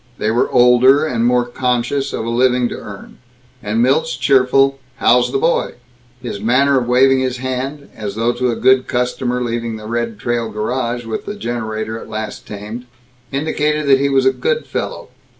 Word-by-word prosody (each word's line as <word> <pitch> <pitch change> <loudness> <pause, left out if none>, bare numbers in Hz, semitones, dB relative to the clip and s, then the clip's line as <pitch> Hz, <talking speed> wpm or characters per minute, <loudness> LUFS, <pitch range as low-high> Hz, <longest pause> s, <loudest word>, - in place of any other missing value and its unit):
They 110 - 0
were 120 +2 +1
older, 125 +4 +5
and 120 -6 0
more 125 0 +2
conscious 125 +2 -1
of 110 - -4
a - - -3
living 125 0 +2
to - - -5
earn. 100 -2 -11 0.4
And 110 +3 0
Milt's 130 -1 +1
cheerful, 135 +1 +3 0.2
"How's 125 +1 +3
the 135 - +1
boy?" 165 +5 0 0.5
his 115 -4 -5
manner 130 +5 +3
of 120 - -4
waving 130 +2 +4
his 130 -1 -1
hand 130 +3 -4
as 105 -2 -5
though 115 +2 +1
to 125 0 -1
a 115 - 0
good 130 +1 +3
customer 125 0 -1
leaving 115 -1 -3
the 110 -1 -9
Red 115 -1 -3
Trail 120 -2 -2
Garage 120 +3 -3
with 110 -1 -5
the 205 - -4
generator 110 - -4
at - - -11
last 110 0 -6
tamed 105 +4 -8 0.4
indicated 150 +1 -1
that 135 -1 +4
he 140 0 +1
was 135 -1 +2
a 130 - +4
"good 475 0 -1
fellow." - - -5
125 Hz, 185 wpm, -17 LUFS, 115-135 Hz, 0.5 s, older